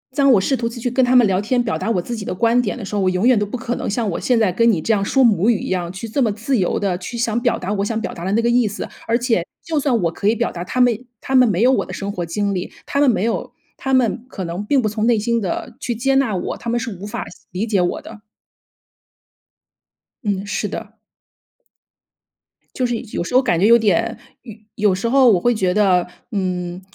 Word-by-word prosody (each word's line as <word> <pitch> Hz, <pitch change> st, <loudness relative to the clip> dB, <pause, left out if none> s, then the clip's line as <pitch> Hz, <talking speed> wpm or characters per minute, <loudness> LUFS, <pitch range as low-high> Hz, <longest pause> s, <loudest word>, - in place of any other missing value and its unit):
当 275 Hz, -1 st, +4 dB
我 200 Hz, -, +4 dB
试 270 Hz, -, +1 dB
图 230 Hz, -2 st, -2 dB
再 235 Hz, -, -9 dB
去 245 Hz, -, -1 dB
跟 260 Hz, +1 st, +2 dB
他 250 Hz, +1 st, +3 dB
们 245 Hz, -2 st, +7 dB
聊 190 Hz, -1 st, +1 dB
天， 245 Hz, +4 st, +1 dB
表 225 Hz, -, -1 dB
达 -, -, -3 dB
我 185 Hz, -5 st, +1 dB
自 240 Hz, +7 st, -5 dB
己 220 Hz, -, -6 dB
的 195 Hz, -, -3 dB
观 235 Hz, +4 st, +3 dB
点 225 Hz, -1 st, -3 dB
的 225 Hz, -, -6 dB
时 195 Hz, -, -8 dB
候， 205 Hz, -, +1 dB
我 185 Hz, -, +2 dB
永 185 Hz, +5 st, +1 dB
远 255 Hz, -2 st, +5 dB
都 205 Hz, -, +1 dB
不 205 Hz, +5 st, -5 dB
可 240 Hz, +1 st, -3 dB
能 -, -, -4 dB
像 215 Hz, +1 st, -1 dB
我 -, -, -3 dB
现 245 Hz, -2 st, +2 dB
在 210 Hz, -5 st, +2 dB
跟 230 Hz, +5 st, +3 dB
你 175 Hz, -7 st, 0 dB
这 225 Hz, -, +1 dB
样 200 Hz, -2 st, +1 dB
说 265 Hz, +6 st, +2 dB
母 215 Hz, -3 st, +4 dB
语 225 Hz, -4 st, +2 dB
一 -, -, -5 dB
样， 175 Hz, -2 st, -2 dB
去 195 Hz, +5 st, -7 dB
这 250 Hz, +6 st, -1 dB
么 230 Hz, -4 st, +2 dB
自 225 Hz, +6 st, -1 dB
由 185 Hz, -4 st, 0 dB
地 190 Hz, -3 st, -1 dB
去 195 Hz, +6 st, -7 dB
想 230 Hz, 0 st, 0 dB
表 -, -, +1 dB
达 190 Hz, +3 st, -3 dB
我 200 Hz, -1 st, -1 dB
想 220 Hz, +1 st, -2 dB
表 -, -, -4 dB
达 170 Hz, -, -8 dB
的 190 Hz, -, -2 dB
那 225 Hz, -, +3 dB
个 235 Hz, -, +1 dB
意 240 Hz, -1 st, +3 dB
思， 205 Hz, +2 st, -5 dB, 0.2 s
而 230 Hz, +1 st, +2 dB
且 235 Hz, -8 st, 0 dB, 0.2 s
就 320 Hz, -2 st, 0 dB
算 265 Hz, -5 st, +1 dB
我 165 Hz, -, +1 dB
可 200 Hz, -, -3 dB
以 220 Hz, -, +4 dB
表 -, -, -1 dB
达， 175 Hz, -, -6 dB
他 220 Hz, +8 st, -4 dB
们 245 Hz, -2 st, +4 dB, 0.2 s
他 265 Hz, -, -2 dB
们 250 Hz, -2 st, +6 dB
没 190 Hz, -1 st, 0 dB
有 255 Hz, -, +5 dB
我 265 Hz, -, +1 dB
的 -, -, -9 dB
生 200 Hz, 0 st, -4 dB
活 180 Hz, -4 st, -4 dB
经 200 Hz, +4 st, -1 dB
历， 180 Hz, -1 st, -4 dB
他 280 Hz, -, -1 dB
们 285 Hz, -, +5 dB
没 215 Hz, -5 st, +1 dB
有 230 Hz, 0 st, -2 dB, 0.3 s
他 265 Hz, -, -3 dB
们 245 Hz, -2 st, +2 dB
可 195 Hz, -, -6 dB
能 175 Hz, +3 st, -4 dB
并 270 Hz, +4 st, +2 dB
不 220 Hz, -, 0 dB
从 215 Hz, +1 st, -1 dB
内 235 Hz, -2 st, +4 dB
心 230 Hz, +2 st, 0 dB
的 185 Hz, -4 st, -4 dB
去 240 Hz, -, -3 dB
接 270 Hz, +4 st, +1 dB
纳 265 Hz, -7 st, +2 dB
我， 180 Hz, -, -3 dB
他 235 Hz, -, -6 dB
们 240 Hz, +1 st, +1 dB
是 225 Hz, -3 st, -5 dB
无 190 Hz, +3 st, -8 dB
法 210 Hz, -, -5 dB, 0.3 s
理 190 Hz, +4 st, -2 dB
解 210 Hz, -5 st, +1 dB
我 175 Hz, -, -1 dB
的。 210 Hz, -, -12 dB, 2.0 s
嗯， 200 Hz, -2 st, -1 dB
是 205 Hz, +1 st, -2 dB
的。 220 Hz, +2 st, -7 dB, 1.8 s
就 255 Hz, -, 0 dB
是 240 Hz, -1 st, -1 dB, 0.2 s
有 -, -, -1 dB
时 180 Hz, -, -7 dB
候 255 Hz, -, +6 dB
感 175 Hz, -, +1 dB
觉 190 Hz, -, +3 dB
有 235 Hz, +1 st, +7 dB
点 225 Hz, +2 st, +1 dB, 0.3 s
有 230 Hz, -4 st, -9 dB, 0.4 s
有 185 Hz, -, +2 dB
时 205 Hz, +5 st, -2 dB
候 255 Hz, 0 st, +5 dB
我 185 Hz, -, +3 dB
会 240 Hz, +5 st, +2 dB
觉 185 Hz, -4 st, +1 dB
得， 190 Hz, -3 st, +3 dB, 0.2 s
嗯， 180 Hz, -3 st, -3 dB
220 Hz, 290 characters per minute, -20 LUFS, 195-240 Hz, 2.0 s, 们